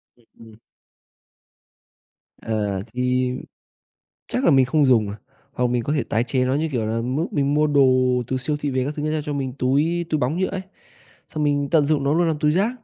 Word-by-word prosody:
Ừm, 120 -1 -29
ừm. 110 -1 -14 1.9
Ờ, 105 -4 -2
thì 125 0 0 1.0
chắc 255 - -1
là - - +5
mình 135 -2 +5
không 145 +2 +2
dùng 115 -5 +4
rồi, 100 - -5 0.4
hoặc 125 0 0
mình 120 -1 0
có 145 - -1
thể 145 - 0
tái 115 +2 0
chế 125 +1 0
nó, 130 - +1
như 160 +2 -1
kiểu 115 -4 -1
là, 115 +1 -1
mốt 135 +8 -1
mình 140 0 +1
mua 150 0 +3
đồ 140 -2 +4 0.4
từ 130 - -1
siêu 150 +4 -2
thị 145 - -2
về 130 0 0
các 145 - -3
thứ, 155 0 -2
ta 155 -1 -1
cho 145 - -3
mình 135 -3 -3
túi 155 +7 +1
túi 155 - +1
bóng 145 +7 0
nhựa 190 - +1
ấy, 190 -1 -4 0.7
xong 155 -1 -3
mình 145 -1 0
tận 155 -4 +4
dụng 150 -2 +1
nó 140 +2 +2
luôn 170 +1 +2
làm 155 -2 -1
túi 150 0 +2
rác. 195 +7 +2
140 Hz, 220 wpm, -22 LUFS, 125-155 Hz, 1.9 s, là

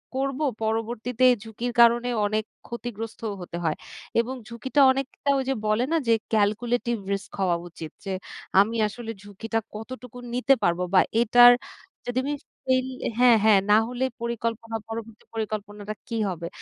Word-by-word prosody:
করবো 275 +2 -1 0.2
পরবর্তীতে 225 +2 -1
এ - - 0
ঝুঁকির 225 +2 -4
কারণে 235 +1 +5 0.2
অনেক 215 +1 0 0.2
ক্ষতিগ্রস্তও 225 -2 -5
হতে 175 -1 -6
হয়। 160 -2 +1 0.4
এবং 245 +3 -1
ঝুঁকিটা 250 +5 0
অনেকটা 270 +1 -3
ওই 270 - 0
যে - - +3
বলে 215 +3 +2
না - - +3
যে, 230 - +5 0.2
ক্যালকুলেটিভ 230 +3 +1 0.2
রিস্ক 200 +1 -5
হওয়া 180 -3 +2
উচিত 160 -2 -8
যে - - -4 0.5
আমি 215 +4 +3
আসলে 230 +2 -8
ঝুঁকিটা 215 +3 -4 0.2
কতটুকু 250 +2 -8 0.2
নিতে 255 +3 +4
পারবো। 175 +1 +2
বা 185 - +7 0.2
এটার 245 +1 +8 0.6
যদি 245 0 -3
আমি 285 +2 -1 0.3
ফেইল 260 0 +2 0.3
হ্যাঁ, 245 -1 +7
হ্যাঁ 215 -2 +6
না - - +8
হলে 250 +1 -3 0.2
পরিকল্পনা 230 -1 -3
পরবর্তী 225 -1 -7
পরিকল্পনাটা 210 -1 -4
কি 230 - -4
হবে? 170 -2 -4
230 Hz, 150 wpm, -25 LUFS, 210-245 Hz, 0.6 s, এটার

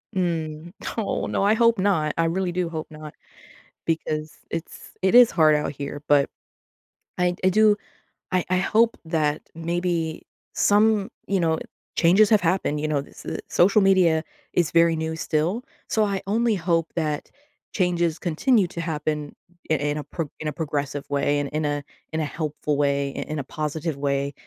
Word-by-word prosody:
Mm. 165 -2 -2 0.2
Aw, 215 - -1
no. - - 0
I 205 +2 +4
hope 230 0 +4
not. 180 -6 +1
I 165 - +2
really 180 +2 0
do 175 -1 -1
hope 160 -1 -5
not 155 -1 -10 0.7
because 155 -1 -2
it's 165 0 -7
it 190 +4 +3
is 245 -1 +8
hard 155 -2 +5
out 150 - -1
here, 145 0 -6
but 145 -1 +4 0.9
I 180 0 +2
I 185 - +6
do 215 +2 +5 0.6
I 185 -1 +2
I 185 - +2
hope 225 +5 +2
that 155 -2 0
maybe 165 -1 -2 0.3
some, 210 0 +3 0.2
you 195 -1 +1
know, 160 -2 +2 0.4
changes 190 +5 +5
have 215 -2 +5
happened. 165 -4 0
You 155 - -1
know, 145 -2 +1
th 140 - -15
s - - -3
social 195 +4 +4
media 180 -5 +4 0.3
is 175 -3 +1
very 165 0 +4
new, 160 0 -2
still. 160 +8 -1 0.2
So, 220 - +2
I 200 -2 -1
only 225 +2 +2
hope 165 -2 +1
that 155 -3 -2 0.4
changes 175 -3 +1
continue 195 - +2
to 170 - -6
happen 150 -2 -2 0.4
i - - +5
in 145 0 -1
a - - -5
pro 165 +1 -4
in 155 - -4
a - - 0
progressive 145 -2 -3
way, 145 +1 +1
and 145 -1 -2
in 155 +1 -2
a 145 -1 -1 0.3
in 160 - 0
a 155 - 0
helpful 150 -1 -2
way, 140 0 +2 0.2
i - - -3
in 155 - -3
a - - -3
positive 155 +3 -3
way 140 0 -1
165 Hz, 175 wpm, -24 LUFS, 150-185 Hz, 0.9 s, is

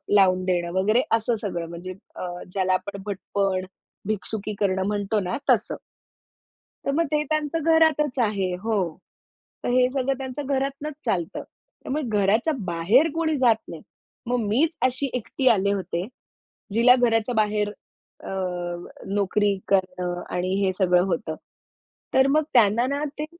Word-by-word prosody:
लावून 185 -2 +4
देणं 175 -2 0
वगैरे, 215 +6 +3
असं 225 +1 0
सगळं, 175 -5 -3
म्हणजे 175 +2 -7 0.2
अ, - - -5 0.3
ज्याला 185 -1 +1
आपण 200 +1 -3
भटपण, 195 -1 -1 0.4
भिक्षुकी 215 0 -3
करणं 190 -1 +1
म्हणतो 205 +1 0
ना, 180 - -2
तसं. - - +1 1.1
तर - - +1
मग 330 +3 +2
ते 300 0 +2
त्यांचं 310 0 -1
घरातच 300 -4 +3
आहे 195 -4 0
हो. 195 -8 -1 0.7
तर - - -1
हे 250 0 +4
सगळं 270 0 0
त्यांच्या 265 +2 -5
घरातूनच 275 +3 -2
चालतं. 175 -8 -1 0.4
त्यामुळे 300 +3 -2 0.2
घराच्या 220 +11 +2
बाहेर 190 - +3
कोणी 320 -2 0
जात 245 -4 +5
नाही. 165 -2 -8 0.4
मग 245 +1 0
मीच 300 +10 +1
अशी 260 +2 0
एकटी 255 +2 -2
आले 200 -3 +3
होते, 185 -2 -2 0.7
जिला 240 +3 +6
घराच्या 235 -1 +1
बाहेर 210 -1 +1 0.5
अ, - - -8 0.9
नोकरी 205 +1 +2 0.2
करणं 180 -2 0
आणि 180 +1 -1
हे 190 - +2
सगळं 180 -2 +3
होतं. 170 -3 -2 0.8
तर 265 0 +5
मग 305 +3 +3
त्यांना 230 -1 +5
ना 280 +2 -1 0.2
ते 300 - -1
210 Hz, 140 wpm, -24 LUFS, 185-260 Hz, 1.1 s, जिला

